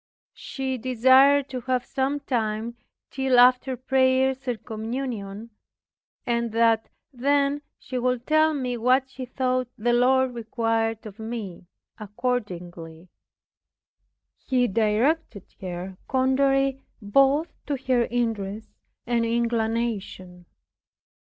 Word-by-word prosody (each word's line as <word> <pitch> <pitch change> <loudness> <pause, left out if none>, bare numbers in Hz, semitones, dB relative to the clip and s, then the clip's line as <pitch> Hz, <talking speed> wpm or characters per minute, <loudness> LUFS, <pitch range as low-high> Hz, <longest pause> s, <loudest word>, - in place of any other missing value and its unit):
She 265 -2 -4
desired 260 +3 +5
to 255 -1 -5
have 255 0 -1
some 275 +1 -1
time 225 -3 -2 0.4
till 265 -2 +1
after 250 +1 +5
prayers 260 +1 +1
and 240 -3 -3
communion, 225 -2 -5 0.7
and 235 -1 -1
that 230 -1 +2 0.2
then 280 +2 +1 0.2
she 255 -1 -5
would 250 0 -1
tell 310 0 +3
me 250 -3 -2
what 255 +3 +2
she 260 -1 -7
thought 255 0 -1
the 240 +2 +1
Lord 255 +1 +3
required 225 -1 -1
of 215 0 -10
me. 220 -6 -6 0.3
Accordingly, 180 -7 -5 1.3
He 250 -2 +1
directed 225 - 0 0.2
her 185 0 -6
contrary 270 +1 +2 0.2
both 275 +9 +2
to 285 -1 -1
her 245 -2 +2
interests 220 -3 -3 0.3
and 235 0 +1
inclination. 225 -6 -2
245 Hz, 105 wpm, -25 LUFS, 220-265 Hz, 1.3 s, desired